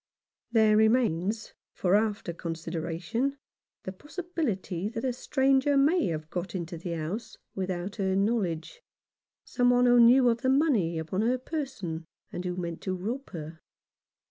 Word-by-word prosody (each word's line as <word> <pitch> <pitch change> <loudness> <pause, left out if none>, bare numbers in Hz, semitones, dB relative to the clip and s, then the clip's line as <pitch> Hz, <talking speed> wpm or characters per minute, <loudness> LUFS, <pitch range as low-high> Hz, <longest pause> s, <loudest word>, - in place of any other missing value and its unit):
There 220 -2 +5
remains 220 -2 +2 0.2
for 180 0 0
after 210 -5 0
consideration 170 - -3 0.5
the 190 - -4
possi 295 - -8
bility 205 - -2
that 230 +2 -4
a 255 - 0
stranger 270 +2 +2
may 310 +5 +3
have 155 -2 -3
got 180 +1 -4
into 170 -1 -4
the 170 +1 -5
house 165 +8 -5 0.2
without 185 +1 -3
her 190 -2 0
knowledge, 200 - -1 0.6
some 245 -1 +1
one 245 0 +4
who 245 0 +6
knew 245 +2 +7
of 230 0 0
the 260 - +1
money 260 - +2
upon 160 +5 -2
her 245 +3 +2
person, 245 - -5 0.3
and 180 - -5
who 180 -1 -3
meant 170 -2 -4
to 185 -1 -2
rob 235 +9 -4
her. 160 -2 -8
205 Hz, 150 wpm, -28 LUFS, 175-250 Hz, 0.6 s, knew